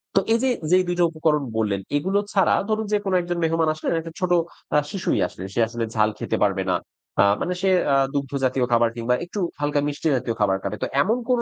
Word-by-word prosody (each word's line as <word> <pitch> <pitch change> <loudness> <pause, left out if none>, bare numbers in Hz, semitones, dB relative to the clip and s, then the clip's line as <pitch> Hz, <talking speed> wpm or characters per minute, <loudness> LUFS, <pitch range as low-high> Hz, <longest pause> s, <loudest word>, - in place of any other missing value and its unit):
তো - - +6
এইযে 255 +3 +2 0.2
যেই 185 0 +5
২ 175 - 0
টো - - +5
উপকরণ 155 -2 +1
বললেন 105 -3 0 0.2
এগুলো 190 +7 +1
ছাড়া 195 - +4 0.2
ধরুন 220 0 0
যে, - - +5
কোনো 190 -1 +1
একজন 175 0 -3
মেহমান 165 0 +2
আসলেন 155 - -3
একটা 165 0 -8
ছোট 185 -2 -1 0.4
আ - - +6
শিশুই 195 - -1
আসলে। 95 - -10
সে - - -2
আসলে 115 0 -4
ঝাল 110 0 +3
খেতে - - -1
পারবে 95 -1 0
না। - - +2 0.5
আ - - +7 0.2
মানে 180 - -1
সে 195 - +2 0.2
আ - - +5 0.2
দুগ্ধ 140 -1 -2
জাতীয় 130 -1 +2
খাবার 115 0 +4
কিংবা 120 +1 0
একটু 185 +4 -6 0.2
হালকা 145 0 +1
মিষ্টি 145 +2 -2
জাতীয় 120 -2 -3
খাবার 95 -2 +3
খাবে। 100 +1 -3
তো - - 0
এমন 220 +10 +2
কোনো 250 -1 +3
150 Hz, 225 wpm, -23 LUFS, 115-185 Hz, 0.5 s, আ